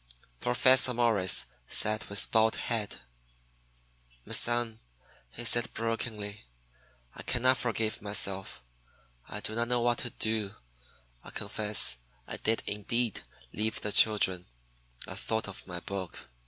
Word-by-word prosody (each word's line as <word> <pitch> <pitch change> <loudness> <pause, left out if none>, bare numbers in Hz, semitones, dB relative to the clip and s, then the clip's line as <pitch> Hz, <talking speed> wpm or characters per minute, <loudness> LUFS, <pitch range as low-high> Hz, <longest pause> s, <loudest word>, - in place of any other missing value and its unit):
Professor 130 - +4
Morris 110 -6 +3 0.2
sat 110 0 +1
with 100 -1 +2
bowed 110 0 +3
head. 110 - -3 1.2
"My - - -8
son," 120 -2 +3 0.5
he 120 - -4
said 120 -1 +4
brokenly, 110 -2 -4 0.7
"I - - -9
can 120 - -2
not 130 0 +4
forgive 115 -2 -1
myself. 100 -7 +1 0.7
I 105 - -5
do 110 - -1
not 115 +1 -1
know 120 0 0
what 120 0 +1
to 120 - -1
do. 110 -3 -1 0.7
I - - -10
confess 105 - 0 0.3
I - - -4
did 110 +1 0
indeed 110 +2 -2 0.3
leave 110 +1 -3
the 105 - -2
children. 95 -5 +4 0.6
I - - -6
thought 110 -1 -3
of 95 -1 -9
my 90 -2 -6
book. 95 -2 -7
110 Hz, 130 wpm, -29 LUFS, 100-115 Hz, 1.2 s, Professor